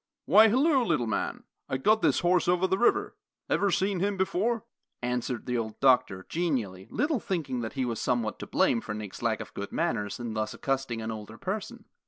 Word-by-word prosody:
"Why, 215 Hz, +2 st, +7 dB
halloo, 265 Hz, +4 st, +3 dB
little 125 Hz, -, +1 dB
man! 110 Hz, -3 st, -2 dB, 0.3 s
I 130 Hz, -, 0 dB
got 215 Hz, +11 st, +3 dB
this -, -, +3 dB
horse 175 Hz, 0 st, +3 dB
over 180 Hz, +1 st, +3 dB
the 190 Hz, +1 st, +1 dB
river. 395 Hz, +12 st, +2 dB, 0.4 s
Ever 200 Hz, -, +3 dB
see 195 Hz, +2 st, +1 dB
him 195 Hz, +2 st, -1 dB
before?" 210 Hz, +4 st, 0 dB, 0.4 s
answered 125 Hz, -1 st, -2 dB
the 125 Hz, -1 st, 0 dB
old 110 Hz, -1 st, -5 dB
doctor, 125 Hz, -8 st, +3 dB
genially, 120 Hz, -, -2 dB
little 295 Hz, -3 st, 0 dB
thinking 155 Hz, -11 st, -2 dB
that 110 Hz, -, -4 dB
he 130 Hz, -2 st, -1 dB
was 115 Hz, -3 st, -3 dB
somewhat 120 Hz, -4 st, -1 dB
to -, -, -6 dB
blame 115 Hz, -, +2 dB
for 105 Hz, -, -5 dB
Nick's 105 Hz, -3 st, -7 dB
lack 115 Hz, -2 st, 0 dB
of -, -, -9 dB
good 100 Hz, -, -6 dB
manners 110 Hz, -, -1 dB
in 120 Hz, -2 st, -4 dB
thus 110 Hz, 0 st, -2 dB
accosting 135 Hz, -4 st, -2 dB
an 110 Hz, -, -3 dB
older 105 Hz, -2 st, -8 dB
person. 200 Hz, +2 st, -5 dB
135 Hz, 200 wpm, -28 LUFS, -, 0.4 s, Why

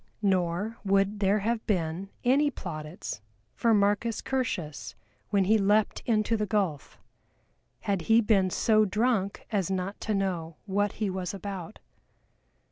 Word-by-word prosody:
Nor 190 Hz, +3 st, 0 dB
would 195 Hz, +1 st, +2 dB
there 200 Hz, +1 st, +3 dB
have 225 Hz, +2 st, -1 dB
been 180 Hz, -1 st, -1 dB
any 280 Hz, +4 st, +4 dB
plaudits 155 Hz, -, -6 dB, 0.3 s
for 230 Hz, -, +2 dB
MARCUS 210 Hz, +2 st, +2 dB
CURTIUS 160 Hz, -, -3 dB, 0.3 s
when 200 Hz, -1 st, +3 dB
he 215 Hz, +4 st, +4 dB
leapt 205 Hz, +2 st, +2 dB
into 220 Hz, -1 st, +2 dB
the 210 Hz, -1 st, -1 dB
gulf, 190 Hz, -10 st, -1 dB, 0.8 s
had 200 Hz, -4 st, -1 dB
he 225 Hz, +1 st, +7 dB
been 205 Hz, -4 st, +3 dB
so 215 Hz, +3 st, +3 dB
drunk 210 Hz, -1 st, 0 dB
as 195 Hz, -5 st, 0 dB
not 190 Hz, +1 st, -3 dB
to 215 Hz, -, -1 dB
know 175 Hz, -5 st, -2 dB
what 205 Hz, 0 st, 0 dB
he 210 Hz, -3 st, -2 dB
was 185 Hz, +1 st, -3 dB
about. 195 Hz, -1 st, -6 dB
200 Hz, 135 wpm, -28 LUFS, 185-215 Hz, 0.8 s, he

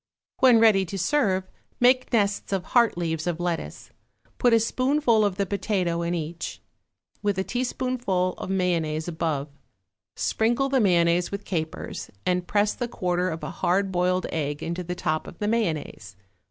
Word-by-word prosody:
When 250 Hz, -3 st, +6 dB
ready 215 Hz, -4 st, +5 dB
to 195 Hz, +3 st, -6 dB
serve, 190 Hz, -, +1 dB, 0.3 s
make 255 Hz, +1 st, +4 dB
nests 205 Hz, -4 st, +1 dB
of 195 Hz, -2 st, 0 dB
heart 235 Hz, -1 st, +3 dB
leaves 160 Hz, -1 st, -2 dB
of 175 Hz, -1 st, -1 dB
lettuce, 175 Hz, -2 st, -4 dB, 0.5 s
put 245 Hz, -, +4 dB
a 230 Hz, -, +6 dB
spoonful 255 Hz, 0 st, +2 dB
of 200 Hz, -3 st, +1 dB
the 200 Hz, +1 st, 0 dB
potato 185 Hz, -3 st, -1 dB
in 170 Hz, +1 st, -1 dB
each, 165 Hz, +1 st, -5 dB, 0.6 s
with 205 Hz, -2 st, 0 dB
a 190 Hz, -, +1 dB
teaspoonful 245 Hz, -6 st, -1 dB
of -, -, -5 dB
mayonnaise 170 Hz, -4 st, 0 dB
above, 160 Hz, -4 st, -2 dB, 0.7 s
sprinkle 240 Hz, +5 st, +1 dB
the 270 Hz, -1 st, +2 dB
mayonnaise 175 Hz, -4 st, +3 dB
with 200 Hz, 0 st, -5 dB
capers, 160 Hz, -4 st, -4 dB, 0.2 s
and 180 Hz, -1 st, 0 dB
press 210 Hz, 0 st, +2 dB
the 245 Hz, -, -3 dB
quarter 180 Hz, -4 st, -1 dB
of 160 Hz, -1 st, -5 dB
a -, -, -4 dB
hard 190 Hz, +2 st, 0 dB
boiled 180 Hz, 0 st, +1 dB
egg 145 Hz, -1 st, -2 dB
into 170 Hz, +2 st, -3 dB
the 180 Hz, +1 st, -4 dB
top 155 Hz, -2 st, -2 dB
of -, -, -10 dB
the 210 Hz, -, -2 dB
mayonnaise. 160 Hz, -, -2 dB
185 Hz, 165 wpm, -25 LUFS, 170-220 Hz, 0.7 s, When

